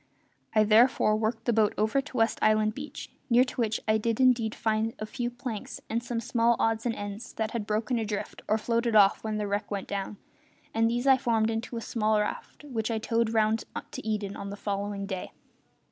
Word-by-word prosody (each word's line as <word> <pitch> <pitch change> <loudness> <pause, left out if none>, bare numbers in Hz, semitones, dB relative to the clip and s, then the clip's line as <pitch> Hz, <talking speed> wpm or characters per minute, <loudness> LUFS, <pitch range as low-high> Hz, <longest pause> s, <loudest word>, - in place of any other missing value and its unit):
I 215 - +6
therefore 215 0 +4
worked 220 +1 -1
the 240 - +2
boat 215 -1 +3
over 220 +6 +2
to 275 -2 -8
West 225 0 +2
Island 215 0 +3
beach, 285 +5 -8 0.2
near 240 +1 +6
to 255 -1 -4
which 220 -1 0
I 215 0 +3
did 230 +1 -1
indeed 240 -4 +3
find 220 0 0
a 215 - -4
few 240 +2 -3
planks 240 -3 -6
and 230 +1 0
some 240 -1 -3
small 235 0 +2
odds 225 +1 +1
and 230 - -1
ends 205 +3 -6
that 220 0 -2
had 220 -3 -3
broken 220 +3 0
adrift 210 -2 -4
or 215 - +3
floated 230 +1 0
off 200 -2 +5
when 215 -1 -2
the 210 - -1
wreck 205 +1 -2
went 200 -2 -4
down, 200 +1 -4 0.6
and 225 0 +3
these 240 +2 -1
I 265 -1 +6
formed 225 -4 +1
into 230 +2 -4
a - - -3
small 215 -1 +1
raft 210 +7 -4
which 240 -7 -3
I 225 - 0
towed 230 +1 0
round 220 0 +2 0.3
to - - -7
Eden 210 -2 -2
on 200 - -6
the 200 - -5
following 200 0 -3
day. 190 -2 -5
220 Hz, 210 wpm, -28 LUFS, 215-235 Hz, 0.6 s, I